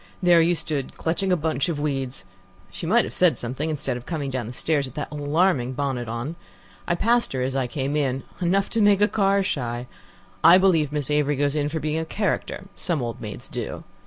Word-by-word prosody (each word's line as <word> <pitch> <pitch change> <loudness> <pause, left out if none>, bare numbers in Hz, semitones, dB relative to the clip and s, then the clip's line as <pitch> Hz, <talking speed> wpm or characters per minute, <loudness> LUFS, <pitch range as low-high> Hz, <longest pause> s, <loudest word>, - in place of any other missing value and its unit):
There 175 -2 +5
you 170 +2 +3
stood 150 -4 -3
clutching 180 +4 0
a 180 - +4
bunch 155 -2 0
of 155 -3 -2
weeds. 135 -3 -2 0.5
She - - -6
might - - +4
have - - -7
said - - +3
something, 130 +6 -3
instead 135 -5 -2
of 120 - -11
coming 145 -5 -3
down 125 -4 -3
the - - -6
stairs 145 +3 0
with 130 - -10
that 150 - -4
alarming 145 -2 +1
bonnet 130 -3 -2
on. 120 +8 -4 0.5
I 170 - +2
passed 235 - +2
her 130 -1 -1
as 130 +1 -2
I 130 -2 0
came 135 +3 -2
in. 135 -3 0 0.2
Enough 190 +3 +1
to 230 - +2
make 205 -1 +6
the 205 +1 +4
car 200 -2 +2
shy. 120 -9 -2 0.6
I 175 - +9
believe 170 -6 +3
Miss 150 -1 -2
Avery 150 0 +2
goes 145 +1 0
in 145 -1 0
for 160 +2 -3
being 155 +1 -1
a 160 - -2
character; 200 +3 -2
some 170 -4 -1
old 115 -1 -5
maids 105 -2 -7
do." - - -5
150 Hz, 220 wpm, -24 LUFS, 130-170 Hz, 0.6 s, I